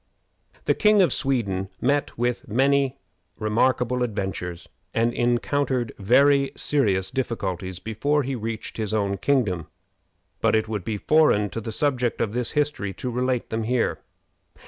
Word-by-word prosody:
The - - +3
King 210 -1 +4
of 165 - +2
Sweden 100 -9 -1
met 145 +3 0
with 120 0 -1
many 135 +3 +2 0.4
remarkable 125 +3 +1
adventures 95 -6 -3 0.3
and 115 +1 +2
encountered 120 +1 0
very 140 +6 +4
serious 100 -10 +1
difficulties 95 -8 -3
before 140 +9 0
he 135 +1 -3
reached 115 -2 -5
his 110 -1 -2
own 100 -2 0
kingdom, 95 - 0 0.7
but 115 - +3
it 110 0 +1
would 105 -4 -3
be 105 +2 -2
foreign 105 - +3
to 115 - -4
the 110 - -5
subject 125 -1 0
of 110 -2 -1
this 120 -1 -2
history 145 -10 -1
to 125 - -4
relate 125 0 -1
them 110 0 -1
here. 120 +2 0
120 Hz, 145 wpm, -24 LUFS, 105-135 Hz, 0.7 s, King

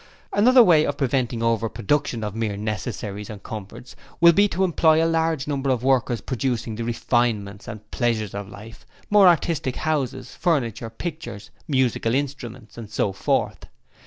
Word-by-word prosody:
'Another 250 +4 +6
way 165 -7 +5
of 145 -2 -2
preventing 125 -4 -1
over 115 -1 +1
production 130 0 -1
of 105 -2 -3
mere 110 -2 -2
necessaries 105 -1 -4
and 105 -2 -9
comforts 110 +2 -9 0.2
will 170 0 +7
be 205 +4 +4
to 190 -1 -1
employ 160 -3 +3
a 165 - +3
large 165 -3 0
number 140 -2 -1
of 125 -2 0
workers 125 -4 +1
producing 120 -3 -2
the 115 - -4
refinements 115 -4 -1
and 110 -1 -9
pleasures 115 -5 -1
of 100 -1 -6
life, 110 +3 -12 0.3
more 205 -2 +7
artistic 165 -6 +1
houses, 150 -5 -2
furniture, 120 - -1
pictures, 120 - -7 0.2
musical 130 -4 +1
instruments 125 -5 -5
and 110 -3 -8
so 105 -1 0
forth. 95 - -1
120 Hz, 160 wpm, -23 LUFS, 110-150 Hz, 0.3 s, will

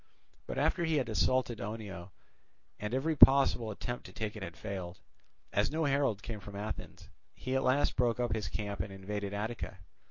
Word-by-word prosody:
But - - -4
after 175 - +2
he 160 -1 +2
had 130 -5 +1
assaulted 120 +1 +1
Oenoe, 100 -4 -5 0.7
and 105 0 -3
every 145 +6 +1
possible 135 -5 +7
attempt 120 +3 -4
to - - -11
take 110 -1 -4
it 105 - -7
had 85 -3 -6
failed, 95 -2 -5 0.6
as 105 - +3
no 160 +1 0
herald 135 -7 +1
came 110 -2 -5
from 100 0 -10
Athens, 105 0 -6 0.2
he 130 +1 -3
at 130 - +3
last 130 +3 +2
broke 120 -1 +2
up 120 -3 +1
his 110 -3 -2
camp 100 -2 -3
and 105 - -3
invaded 100 +1 -4
Attica. 105 -1 -4
110 Hz, 185 wpm, -32 LUFS, 100-130 Hz, 0.7 s, possible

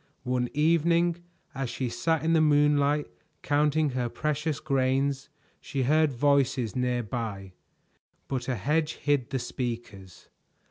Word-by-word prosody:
One 125 -1 -1
evening, 170 +2 +3 0.4
as 135 -2 -3
she 130 - -3
sat 145 +7 -1
in 165 - +3
the 160 - +4
moonlight 145 -1 +3 0.4
counting 150 0 +2
her 125 -1 -2
precious 150 +2 -2
grains, 135 0 0 0.3
she 135 -2 -3
heard 155 +3 +3
voices 135 -3 +1
near 125 -1 0
by, 105 -5 -5 0.7
but 130 -2 -3
a 130 - 0
hedge 150 - 0
hid 145 -4 0
the 135 - -1
speakers. 115 -8 -6
135 Hz, 130 wpm, -27 LUFS, 125-150 Hz, 0.7 s, the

